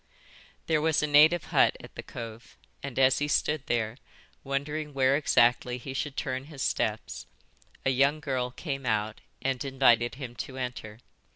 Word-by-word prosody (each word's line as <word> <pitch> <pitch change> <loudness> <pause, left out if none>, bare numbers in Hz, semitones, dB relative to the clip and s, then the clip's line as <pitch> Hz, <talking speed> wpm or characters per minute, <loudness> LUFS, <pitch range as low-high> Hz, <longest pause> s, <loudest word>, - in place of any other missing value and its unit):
"There 155 -2 +1
was 160 -1 +2
a - - +3
native 155 +3 +5
hut - - +4
at - - -13
the - - -7
cove 115 0 -9 0.2
and 140 -3 -7
as 130 -1 +4
he 145 - 0
stood 150 -1 0
there, 115 -1 -1 0.5
wondering 145 +2 -3
where 135 0 +3
exactly 125 -3 +3
he 130 +2 -7
should 140 +1 -4
turn 130 +1 -3
his 145 -3 -6
steps, - - -2 0.6
a 135 - +3
young 140 +4 +3
girl 130 -4 -2
came 135 0 -5
out 110 -1 -1 0.2
and 130 -2 -1
invited 125 -4 +3
him 130 -3 -7
to 130 +2 -6
enter. 120 -3 -6
135 Hz, 165 wpm, -28 LUFS, 125-145 Hz, 0.6 s, native